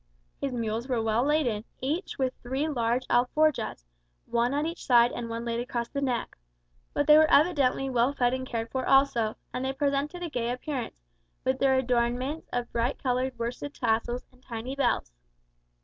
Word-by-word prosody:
His 275 Hz, -, -2 dB
mules 230 Hz, 0 st, -2 dB
were 250 Hz, -3 st, 0 dB
well 225 Hz, +1 st, +1 dB
laden; 270 Hz, -8 st, +1 dB, 0.2 s
each 310 Hz, +8 st, -2 dB
with 260 Hz, -1 st, 0 dB
three 265 Hz, +5 st, -1 dB
large 245 Hz, -3 st, 0 dB
alforjas, 250 Hz, -, +1 dB, 0.4 s
one 235 Hz, +1 st, +1 dB
at 290 Hz, +2 st, 0 dB
each 335 Hz, +1 st, -5 dB
side 240 Hz, -2 st, +5 dB
and 235 Hz, -1 st, -5 dB
one 230 Hz, +1 st, -4 dB
laid 235 Hz, 0 st, -1 dB
across 240 Hz, -1 st, -3 dB
the 280 Hz, -, -3 dB
neck. 250 Hz, -4 st, -1 dB, 0.6 s
But 290 Hz, -, 0 dB
they 300 Hz, +1 st, +8 dB
were 315 Hz, 0 st, +5 dB
evidently 280 Hz, -4 st, +3 dB
well 250 Hz, 0 st, +2 dB
fed 250 Hz, -3 st, +1 dB
and 260 Hz, 0 st, -3 dB
cared 230 Hz, -2 st, -3 dB
for 260 Hz, -1 st, -1 dB
also; 245 Hz, -5 st, +3 dB, 0.2 s
and 250 Hz, -, -2 dB
they 265 Hz, 0 st, -1 dB
presented 285 Hz, +5 st, -1 dB
a 340 Hz, -, -3 dB
gay 240 Hz, -3 st, -1 dB
appearance, 250 Hz, -, -4 dB, 0.4 s
with 260 Hz, 0 st, 0 dB
their 270 Hz, -1 st, +4 dB
adornments 250 Hz, +4 st, 0 dB
of 245 Hz, -1 st, -2 dB
bright 235 Hz, +3 st, 0 dB
coloured 255 Hz, 0 st, 0 dB
worsted 240 Hz, +5 st, -4 dB
tassels 240 Hz, +1 st, 0 dB
and 255 Hz, 0 st, -24 dB
tiny 245 Hz, +2 st, -6 dB
bells. 275 Hz, -, 0 dB
255 Hz, 180 wpm, -28 LUFS, 235-275 Hz, 0.6 s, they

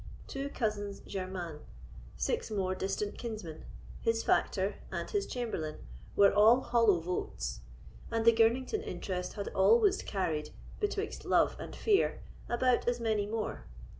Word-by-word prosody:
Two 275 Hz, +1 st, -4 dB
cousins 205 Hz, -5 st, -2 dB
german, 185 Hz, -5 st, -5 dB, 0.6 s
six -, -, -1 dB
more 190 Hz, -3 st, 0 dB
distant 195 Hz, +2 st, -3 dB
kinsmen, 215 Hz, -9 st, -6 dB, 0.4 s
his 225 Hz, 0 st, +1 dB
factor 195 Hz, 0 st, +1 dB
and -, -, -3 dB
his 405 Hz, -2 st, -1 dB
chamberlain, 220 Hz, -11 st, -3 dB, 0.4 s
were 200 Hz, -1 st, +6 dB
all 220 Hz, +5 st, +6 dB
hollow 230 Hz, -8 st, +3 dB
votes; 165 Hz, -, -3 dB, 0.5 s
and 225 Hz, -1 st, -1 dB
the 230 Hz, -, +8 dB
Girnington 240 Hz, -, +2 dB
interest 185 Hz, -, -4 dB
had 200 Hz, -2 st, -4 dB
always 400 Hz, -, +4 dB
carried, 165 Hz, -6 st, -2 dB, 0.3 s
betwixt 415 Hz, 0 st, -2 dB
love -, -, +3 dB
and -, -, -7 dB
fear, 410 Hz, -3 st, +2 dB, 0.3 s
about 245 Hz, +1 st, +2 dB
as 245 Hz, 0 st, +1 dB
many 215 Hz, -3 st, 0 dB
more. 215 Hz, 0 st, -3 dB
215 Hz, 135 wpm, -32 LUFS, 190-240 Hz, 0.6 s, the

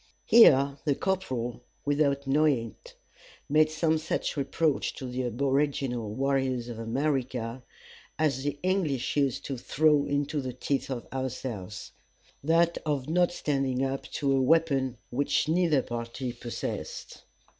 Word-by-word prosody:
Here 140 Hz, -, +6 dB
the 145 Hz, -3 st, +1 dB
corporal, 130 Hz, -12 st, -2 dB, 0.2 s
without 140 Hz, -1 st, +1 dB
knowing 135 Hz, -5 st, +2 dB
it, -, -, -15 dB, 0.5 s
made 155 Hz, +1 st, +4 dB
some 155 Hz, 0 st, +1 dB
such 160 Hz, -, -2 dB
reproach 150 Hz, +1 st, 0 dB
to 130 Hz, -, -7 dB
the 125 Hz, +1 st, -3 dB
aboriginal 135 Hz, -2 st, 0 dB
warriors 130 Hz, 0 st, 0 dB
of 115 Hz, -2 st, -6 dB
America 125 Hz, -1 st, -2 dB, 0.6 s
as 150 Hz, -3 st, +1 dB
the 145 Hz, 0 st, -2 dB
English 180 Hz, -9 st, 0 dB
used 140 Hz, -4 st, 0 dB
to 135 Hz, -3 st, -4 dB
throw 150 Hz, +2 st, +2 dB
into 145 Hz, +1 st, -1 dB
the 130 Hz, -1 st, -5 dB
teeth 135 Hz, +3 st, -2 dB
of 125 Hz, -3 st, -4 dB
ourselves 125 Hz, -7 st, -5 dB, 0.5 s
that 165 Hz, +2 st, +3 dB
of 145 Hz, -3 st, -2 dB
not 175 Hz, +1 st, +3 dB
standing 135 Hz, -5 st, 0 dB
up 135 Hz, 0 st, -3 dB
to 140 Hz, -2 st, 0 dB
a 135 Hz, -, +2 dB
weapon 135 Hz, -4 st, +2 dB
which 140 Hz, +4 st, +1 dB
neither 160 Hz, -4 st, +2 dB
party 120 Hz, +2 st, -5 dB
possessed. 120 Hz, -1 st, -6 dB
135 Hz, 135 wpm, -28 LUFS, 125-150 Hz, 0.6 s, Here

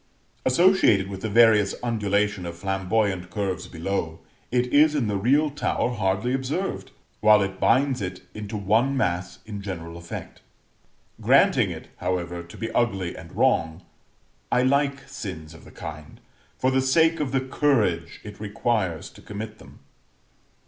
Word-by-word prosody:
Associated 130 Hz, -, +4 dB
with 95 Hz, -1 st, -7 dB
the 110 Hz, -, -2 dB
various 105 Hz, -2 st, +5 dB
undulation 105 Hz, -4 st, 0 dB
of 85 Hz, 0 st, -7 dB
flamboyant 95 Hz, 0 st, -1 dB
curves 95 Hz, -1 st, -3 dB
below, 85 Hz, -1 st, -3 dB, 0.3 s
it 125 Hz, 0 st, +2 dB
is 150 Hz, +1 st, +5 dB
in 140 Hz, -5 st, +1 dB
the 105 Hz, -1 st, -1 dB
real 140 Hz, +9 st, +2 dB
tower 140 Hz, -3 st, -1 dB
hardly 105 Hz, +2 st, 0 dB
observed, 135 Hz, +9 st, -2 dB, 0.3 s
while 105 Hz, -1 st, +6 dB
it 95 Hz, 0 st, -5 dB
binds 130 Hz, +1 st, +2 dB
it 90 Hz, -1 st, -5 dB
into 105 Hz, 0 st, -5 dB
one 110 Hz, +7 st, +2 dB
mass 90 Hz, -7 st, -1 dB
in 105 Hz, -2 st, -6 dB
general 85 Hz, -4 st, -6 dB
effect. 85 Hz, 0 st, -8 dB, 0.8 s
Granting -, -, +4 dB
it, -, -, -8 dB
however, 90 Hz, -1 st, -2 dB
to 85 Hz, 0 st, -13 dB
be 115 Hz, -1 st, -4 dB
ugly 100 Hz, -8 st, 0 dB
and 85 Hz, -2 st, -11 dB
wrong, 80 Hz, +2 st, +1 dB, 0.7 s
I 125 Hz, -, +3 dB
like 140 Hz, +1 st, +1 dB
sins 90 Hz, -, -7 dB
of 80 Hz, -, -15 dB
the -, -, -14 dB
kind, 75 Hz, 0 st, -9 dB, 0.4 s
for 130 Hz, -, +1 dB
the 130 Hz, 0 st, +2 dB
sake 160 Hz, +5 st, +3 dB
of 145 Hz, -4 st, -1 dB
the 135 Hz, -, +2 dB
courage 115 Hz, -, 0 dB
it 105 Hz, -1 st, -10 dB
requires 105 Hz, -5 st, -1 dB
to -, -, -16 dB
commit 110 Hz, +1 st, -7 dB
them. -, -, -16 dB
105 Hz, 150 wpm, -25 LUFS, 90-130 Hz, 0.8 s, while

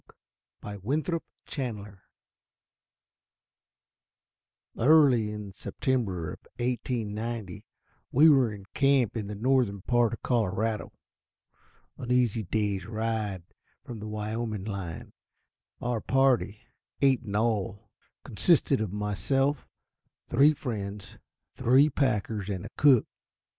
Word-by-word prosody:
_ -, -, -36 dB, 0.6 s
A 105 Hz, -, -5 dB
Day -, -, -16 dB
with 140 Hz, +9 st, -1 dB
the 165 Hz, -3 st, -5 dB
Elk 105 Hz, -5 st, -7 dB, 2.7 s
Early 130 Hz, -5 st, +5 dB
in 105 Hz, -2 st, -7 dB
September 95 Hz, -, -2 dB
of -, -, -11 dB, 0.2 s
1890, 115 Hz, -4 st, -3 dB, 0.5 s
we 150 Hz, +5 st, +6 dB
were 135 Hz, -7 st, +5 dB
in 100 Hz, -2 st, -9 dB
camp 135 Hz, -5 st, +3 dB
in 110 Hz, -3 st, -3 dB
the 105 Hz, -, -5 dB
northern 115 Hz, -4 st, +1 dB
part 120 Hz, -1 st, +2 dB
of -, -, -7 dB
Colorado, 110 Hz, -2 st, 0 dB, 1.1 s
an 125 Hz, -, -4 dB
easy 120 Hz, -3 st, +2 dB
day's 100 Hz, 0 st, -2 dB
ride 110 Hz, -4 st, -2 dB, 0.4 s
from 120 Hz, -3 st, -7 dB
the 105 Hz, -, -7 dB
Wyoming 110 Hz, -1 st, -3 dB
line. 95 Hz, -6 st, -6 dB, 0.7 s
Our 120 Hz, -2 st, -2 dB
party, 130 Hz, -6 st, +1 dB, 0.4 s
eight 135 Hz, -3 st, +4 dB
in 105 Hz, -4 st, -6 dB
all, 105 Hz, -1 st, -1 dB, 0.3 s
consisted -, -, +2 dB
of 105 Hz, -4 st, -2 dB
myself, 130 Hz, +8 st, 0 dB, 0.6 s
three 145 Hz, +5 st, +4 dB
friends, 100 Hz, -6 st, -6 dB, 0.3 s
three 135 Hz, +5 st, +4 dB
packers, 110 Hz, -7 st, -1 dB
and 95 Hz, -1 st, -4 dB
a -, -, -7 dB
cook. 135 Hz, -6 st, +5 dB
110 Hz, 110 wpm, -28 LUFS, 105-125 Hz, 2.7 s, we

